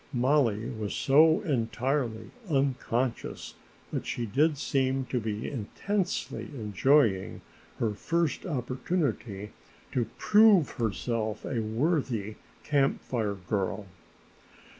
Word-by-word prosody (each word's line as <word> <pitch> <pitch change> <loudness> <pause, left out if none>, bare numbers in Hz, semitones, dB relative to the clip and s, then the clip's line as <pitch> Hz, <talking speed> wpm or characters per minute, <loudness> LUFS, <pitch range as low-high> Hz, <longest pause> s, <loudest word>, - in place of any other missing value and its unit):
Mollie 125 -3 +2
was 110 -4 -4
so 155 +6 +5
entirely 120 - -1 0.2
unconscious, 130 -3 -1 0.4
but - - -3
she 120 - -2
did 145 +7 +2
seem 135 -1 0
to 125 - -1
be 110 -1 -3
intensely 180 - -2
enjoying 110 -1 +2 0.4
her 110 -3 0
first 165 +8 -1
opportunity 125 - -2 0.4
to 120 -3 0
prove 210 -7 +5
herself 110 -1 -2
a 120 -4 -1
worthy 115 - -1 0.3
Camp 140 -2 +2
Fire 110 -5 -1
Girl. 95 +1 -2
125 Hz, 95 wpm, -28 LUFS, 110-145 Hz, 0.4 s, so